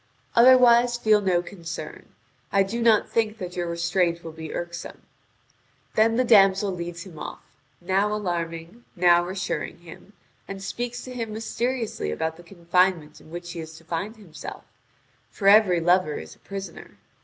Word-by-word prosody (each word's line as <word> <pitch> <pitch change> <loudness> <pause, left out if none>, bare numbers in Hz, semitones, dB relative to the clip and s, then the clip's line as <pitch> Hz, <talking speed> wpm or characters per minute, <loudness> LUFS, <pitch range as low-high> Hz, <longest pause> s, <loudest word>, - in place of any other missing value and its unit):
Otherwise 240 -1 +6
feel 215 -3 +3
no 180 -3 +1
concern. 165 -4 -8 0.4
I 195 0 +4
do 225 +5 -4
not 225 -2 +4
think 220 -1 0
that 180 -4 -7
your 175 -1 -2
restraint 170 0 0
will 165 - -7
be 160 -1 -8
irksome." 175 0 -6 0.9
Then 225 +1 +3
the 255 - +3
damsel 195 -3 +5
leads 170 -1 -6
him 170 -6 -12
off, - - -7 0.4
now 195 +4 +1
alarming, 175 0 -4
now 175 -1 +5
reassuring 185 -2 -4
him, 175 +4 -14 0.3
and 195 0 -7
speaking 240 +4 -4
to 255 - -8
him 230 -3 -4
mysteriously 230 - -3
about 160 - -2
the 170 - -14
confinement 175 -3 0
in - - -17
which 175 +1 -7
he 170 - -7
is 160 0 -8
to 165 - -16
find 170 +7 -4
himself; 200 -8 -10 0.7
for 195 - -3
every 200 -4 +6
lover 175 -2 +2
is - - -8
a - - -29
prisoner. 195 0 -9
185 Hz, 160 wpm, -25 LUFS, 170-215 Hz, 0.9 s, Otherwise